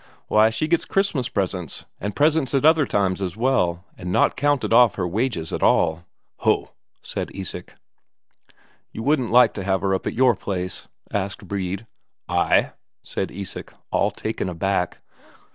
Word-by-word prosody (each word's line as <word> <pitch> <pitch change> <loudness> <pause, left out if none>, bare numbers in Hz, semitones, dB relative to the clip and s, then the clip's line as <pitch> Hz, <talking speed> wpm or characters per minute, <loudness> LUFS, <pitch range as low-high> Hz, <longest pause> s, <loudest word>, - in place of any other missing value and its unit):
Why, 110 +1 +5
she 115 +7 -1
gets 170 0 +2
Christmas 195 - 0
presents, 90 -5 -3
and 105 +1 -4
presents 150 -2 +2
other 150 +1 +4
times 95 -1 0
as 95 0 -3
well, 95 -8 +1
and 90 0 -6
not - - +3
counted 145 -4 +1
off 120 -5 +6
her 90 - -1
wages 95 -4 -2
at - - -2
all." 80 +2 +2 0.3
"Ho!" - - +1 0.3
said - - -4
Isak. 95 -2 -7 1.2
"You 110 - -6
wouldn't 135 -4 +2
like 120 -1 +6
to 100 - -5
have 95 -1 0
her 95 0 +1
up 95 - -2
at - - -3
your 125 -1 +4
place?" 90 -2 -4 0.3
asked 100 0 -3
Brede. 95 +2 -3 0.4
"I?" - - +2 0.3
said - - -3
Isak, 100 0 -6 0.2
all - - +2
taken - - -4
aback. 90 +1 -1
100 Hz, 155 wpm, -23 LUFS, 90-130 Hz, 1.2 s, off